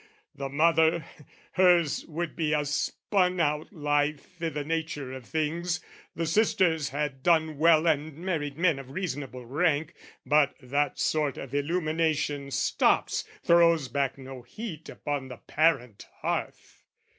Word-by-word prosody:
The 135 -1 -5
mother, 160 +2 +3 0.5
hers 175 -5 +3
would 170 +1 -4
be 160 -2 0
a 150 -1 +1
spun 180 +5 0
out 150 -1 0
life 150 +1 -1
I' 165 - 0
the 150 -2 -4
nature 155 -4 -3
of 130 -3 -9
things; 165 +2 -1 0.4
the 165 - -1
sisters 165 -4 +2
had 145 -1 -3
done 160 -2 +2
well 160 0 +5
And 155 -2 0
married 160 -5 -3
men 165 -5 +2
of 135 -1 -10
reasonable 140 -6 -5
rank: 155 +4 0 0.3
But 145 +1 +3
that 145 +3 -1
sort 150 -4 0
of 135 -1 -8
illumination 155 -2 0
stops, 135 - +1 0.2
Throws 170 -5 +4
back 140 +1 -1
no 135 -1 -9
heat 165 - -8
upon 145 -3 -4
the 125 -2 -9
parent 135 -9 0 0.2
hearth. - - -4
155 Hz, 135 wpm, -28 LUFS, 140-165 Hz, 0.5 s, well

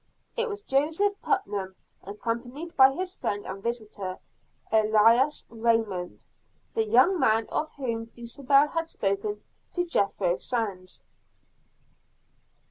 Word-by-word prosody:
It 470 0 0
was 410 -1 -4
Joseph 320 +9 +2
Putnam, 205 - -1 0.3
accompanied 235 - -5
by 265 0 +7
his 365 +5 -4
friend 205 - -3
and 190 +1 -6
visitor, 210 -5 -4 0.5
Ellis 220 +6 +4
Raymond, 225 -6 -1 0.5
the 225 - +2
young 260 - +5
man 220 -3 +3
of 310 - -1
whom 230 -5 -3
Dulcibel 275 +5 +2
had 330 +1 -2
spoken 205 -1 -2 0.3
to 355 -1 0
Jethro 195 - +1
Sands. 200 -7 -4
230 Hz, 110 wpm, -27 LUFS, 205-295 Hz, 0.5 s, by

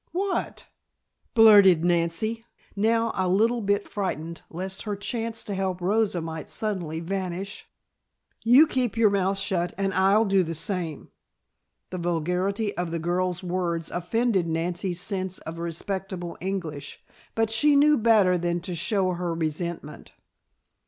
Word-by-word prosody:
"What?" 385 +2 -2 0.7
blurted 200 -7 +7
Nancy, 175 +7 0 0.3
now 225 +2 +2
a 185 -1 0
little 225 +6 +2
bit 200 0 0
frightened 170 -5 -4
lest 190 +3 -5
her 210 -2 -3
chance 225 +2 -3
to 205 - -4
help 190 -1 -2
Rosa 195 0 +1
might 160 -1 -6
suddenly 180 -7 -3
vanish. 190 +2 -5 0.7
"You 250 +7 +7
keep 250 -7 -1
your 220 -3 +4
mouth 195 0 +1
shut 175 -3 -1
and 195 -1 -1
I'll 195 +4 +4
do 195 -1 +3
the 165 -2 -3
same!" 170 -4 -4 0.8
The 185 - -4
vulgarity 180 +5 -1
of 175 -1 -2
the 170 - -2
girl's 180 +2 -1
words 175 -2 -2
offended 190 +1 0
Nancy's 175 +2 -2
sense 190 -1 -3
of 165 +1 -8
respectable 175 +1 -4
English, 165 -7 -4 0.4
but 225 -1 +1
she 285 +7 +4
knew 300 +1 +6
better 210 -7 +4
than 175 0 -1
to 180 0 -4
show 185 +2 0
her 175 -1 -3
resentment. 160 -1 -4
185 Hz, 140 wpm, -25 LUFS, 170-210 Hz, 0.8 s, blurted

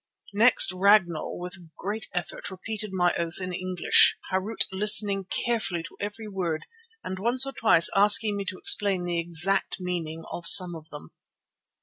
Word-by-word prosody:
Next 225 0 +4
Ragnall 185 -3 0
with 180 +1 -9
a 175 -2 -18
great 210 +3 -6
effort 175 +2 -7
repeated 210 +2 -7
my 180 -2 -1
oath 170 +1 -5
in 185 -1 -7
English, 185 0 +2 0.2
Harût 190 +4 -3
listening 200 0 +4
carefully 205 -6 -3
to - - -14
every 210 +2 -8
word 180 -6 -6 0.4
and 185 0 -8
once 245 +6 0
or 275 - -7
twice 220 -10 +3
asking 205 +1 +2
me 200 - -5
to 185 - -7
explain 195 -2 +1
the 175 -1 -4
exact 175 +5 0
meaning 165 -3 -7
of 170 - -6
some 180 -2 +8
of 160 -1 -14
them. 150 - -13
190 Hz, 160 wpm, -24 LUFS, 175-205 Hz, 0.4 s, some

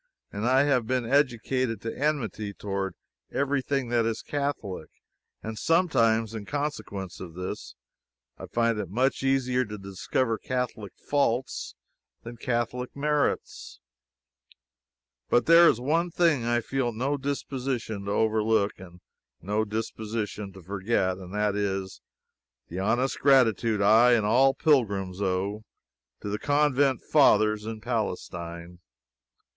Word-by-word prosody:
I 125 +6 +3
have 130 -6 +1
been 125 -1 0
educated 130 -2 +1
to 115 - -5
enmity 115 -8 -2
toward 95 -3 -3 0.4
every 140 0 0
thing 135 -2 -2
that 120 -1 +2
is 115 0 -2
Catholic, 135 - -3 0.5
and 110 -1 -5
sometimes, 115 - +2
in 110 -2 -6
consequence 140 - -4
of 85 -3 -9
this, 90 -7 -6 0.6
I - - -9
find 115 -2 +1
it 100 -5 -4
much 130 +7 0
easier 130 -1 +1
to 105 0 -7
discover 100 +4 -2
Catholic 125 -6 -3
faults 135 -3 -1 0.5
than 115 0 -9
Catholic 125 +1 -2
merits. 150 0 -1 1.5
But 120 - +3
there 170 +1 +8
is 115 - +1
one 165 +7 +1
thing 165 -8 +2
I 120 0 +1
feel 130 0 -1
no 130 +6 -1
disposition 130 -6 -3
to 100 - -2
overlook, 110 -1 +2
and 90 -1 -13 0.4
no 105 +5 -1
disposition 110 -1 -4
to 95 -1 -13
forget: 95 0 -1
and 90 -1 -10
that 105 -1 +1
is, 95 -2 -3 0.7
the 90 - -5
honest 120 +7 0
gratitude 115 -6 +3
I 115 +4 +6
and 110 -3 +2
all 130 +5 +4
pilgrims 100 - +1
owe, 100 +2 -1 0.6
to 105 - -5
the 105 +1 -2
Convent 145 -3 +2
Fathers 110 -7 +3
in 110 -1 -5
Palestine. 90 -6 -4
115 Hz, 130 wpm, -27 LUFS, 100-135 Hz, 1.5 s, there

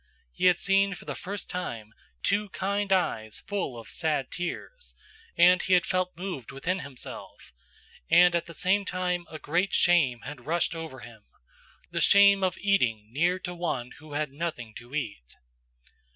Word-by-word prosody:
"He - - -2
had 180 -2 +6
seen 195 0 +2
for - - -12
the - - -4
first 200 +2 -5
time 115 -12 -5 0.3
two 205 0 +1
kind 200 +1 -2
eyes 110 - 0
full 190 -12 -3
of 115 - -10
sad 150 -5 -1
tears, 335 - -6 0.4
and 180 +1 +6
he 190 - +1
had 180 - +3
felt 185 -1 -1
moved 175 - -5
within 170 +8 -2
himself, 130 - -9 0.6
and 180 0 +6
at 170 -1 0
the 170 - -10
same 195 +5 +2
time 180 -2 -2
a 155 - -7
great 175 +6 0
shame 145 -9 +3
had 145 -3 -9
rushed 170 +1 +1
over 160 -6 -7
him; 115 -4 -13 0.7
the - - -1
shame 200 -1 +6
of 185 -2 +1
eating 120 - +1
near 175 +6 +2
to 180 - -5
one 155 -8 -3
who 155 -1 -12
had 150 -1 -2
nothing 140 -7 -5
to 120 +4 -10
eat. 100 - -5
170 Hz, 165 wpm, -27 LUFS, 130-185 Hz, 0.7 s, had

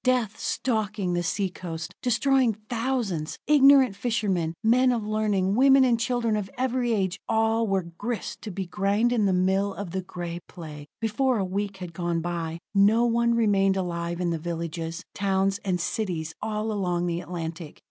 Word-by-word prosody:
Death 245 -4 +1
stalking 210 -6 -1
the 175 - +1
sea 190 +3 -1
coast, 170 -3 -6
destroying 255 0 +3 0.2
thousands; 225 -10 -1
ignorant 275 -6 +6
fishermen, 200 -7 -1
men 250 +3 +4
of 230 -3 -1
learning, 210 -3 +1
women 270 +3 +6
and 240 -3 +3
children 235 -2 0
of 205 -2 -3
every 255 -1 0
age 195 -3 0
all 225 0 +2
were 195 -2 +1
grist 205 +8 -5
to 215 - -6
be 190 0 -4
ground 205 +6 +1
in 215 -4 +2
the - - +2
mill 190 +2 +1
of 200 -4 -6
the 190 +1 -2
Gray 175 -2 -6
Plague. 150 -4 -9
Before 235 +3 +1
a 195 - 0
week 200 +1 -3
had 180 -3 -7
gone 170 -2 -1
by, 165 -1 -3 0.2
no 210 +4 +5
one 235 0 +2
remained 195 -4 +3
alive 170 -2 -3
in 175 -1 0
the 165 - -2
villages, 165 0 -4
towns 195 0 +1
and 185 -3 0
cities 170 -4 -2
all 215 0 -2
along 180 -4 -1
the 170 0 -1
Atlantic. 165 -2 -6
195 Hz, 170 wpm, -26 LUFS, 175-230 Hz, 0.2 s, ignorant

